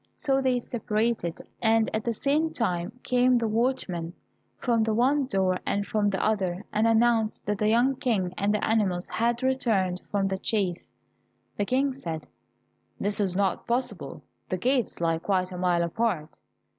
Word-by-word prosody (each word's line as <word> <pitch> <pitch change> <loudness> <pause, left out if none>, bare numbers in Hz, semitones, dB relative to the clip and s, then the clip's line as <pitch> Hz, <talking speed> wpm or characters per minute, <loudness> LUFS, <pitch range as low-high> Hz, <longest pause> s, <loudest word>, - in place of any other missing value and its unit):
So 270 -2 +1
they 255 -2 +2
separated, 220 -6 -2 0.2
and 225 -1 +3
at 220 - -1
the 235 - 0
same 300 +7 +1
time 190 +1 -2
came 250 0 +3
the 235 -2 +1
watchmen 215 -8 -1 0.4
from 235 -3 +1
the 220 -1 +1
one 265 +4 +2
door 190 -4 +1
and 200 0 -1
from 210 -1 0
the 195 -1 0
other, 195 -3 0
and 215 +2 +3
announced 225 -1 +2
that 205 0 -1
the 215 - +2
young 245 +4 +3
King 215 -10 0
and 200 +2 +1
the 210 - 0
animals 195 -5 +1
had 235 +2 0
returned 215 -9 +1
from 200 -1 +1
the 190 0 -2
chase. 190 -5 -1 0.7
The 205 - -1
King 265 +4 +1
said, 165 - -6 0.7
"It 205 +1 0
is 190 -3 0
not 195 -2 0
possible, 245 +2 -2 0.3
the 185 - -1
gates 250 +4 0
lie 165 -1 +1
quite 185 0 0
a 180 - -6
mile 175 -1 +2
apart." 170 -3 -1
215 Hz, 170 wpm, -27 LUFS, 185-240 Hz, 0.7 s, and